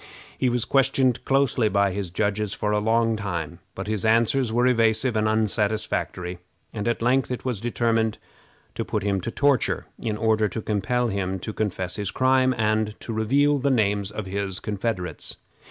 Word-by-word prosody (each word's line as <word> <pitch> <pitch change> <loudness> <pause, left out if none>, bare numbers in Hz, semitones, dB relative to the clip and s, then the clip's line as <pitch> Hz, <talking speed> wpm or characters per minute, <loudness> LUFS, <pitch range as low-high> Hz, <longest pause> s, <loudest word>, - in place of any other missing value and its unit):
He 130 - +1
was 120 -1 0
questioned 135 -2 +2
closely 135 -5 +2
by 100 -1 +2
his 95 -1 -3
judges 100 +3 -1
for 105 - -1
a 105 - +2
long 115 +1 +2
time, 85 -8 -4 0.2
but 95 - -5
his 105 -2 -2
answers 115 +2 +3
were 120 +2 +2
evasive 115 0 +2
and 110 0 +2
unsatisfactory, 105 -4 -1 0.3
and 105 0 -3
at 120 -1 0
length 130 +2 +2
it 125 0 -4
was 120 -6 -2
determined 115 -2 0 0.6
to - - -3
put - - -2
him 100 -2 0
to 115 - -3
torture, 140 0 +1
in 110 -2 -2
order 110 -1 +2
to 110 - -4
compel 115 +4 0
him 95 -2 -2
to 110 - -5
confess 95 -3 -2
his 100 -2 -2
crime, 130 +1 +3
and 110 -1 0
to 115 - -5
reveal 140 +7 +2
the 140 +2 +1
names 105 -5 +1
of 105 -1 -5
his 95 0 -3
confederates. 100 -6 -3
110 Hz, 175 wpm, -24 LUFS, 100-120 Hz, 0.6 s, answers